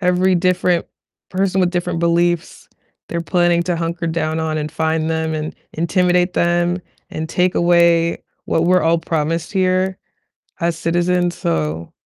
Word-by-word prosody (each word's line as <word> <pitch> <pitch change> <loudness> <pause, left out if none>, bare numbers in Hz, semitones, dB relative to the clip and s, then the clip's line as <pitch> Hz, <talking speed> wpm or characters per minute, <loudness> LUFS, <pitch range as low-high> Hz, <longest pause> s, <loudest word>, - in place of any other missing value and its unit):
every 180 0 +2
different 180 -1 +1 0.4
person 190 0 0
with 180 - +2
different 175 -1 -2
beliefs, 170 0 0 0.4
they're 170 - -2
planning 175 0 +2
to 175 -2 -1
hunker 165 +1 -3
down 160 -1 -1
on 155 -1 -2
and 150 0 -3
find 160 0 -1
them, 160 0 -1
and 155 0 -4 0.2
intimidate 180 +2 +1
them, 175 +1 +1 0.3
and 155 0 -4
take 180 +1 +1
away 170 -1 +3 0.2
what 165 - +1
we're 180 +1 +3
all 165 +1 +3
promised 165 +1 -2
here 185 0 +1 0.6
as 170 -1 0
citizens, 175 +1 0
so 80 0 -2
170 Hz, 145 wpm, -19 LUFS, 160-180 Hz, 0.6 s, away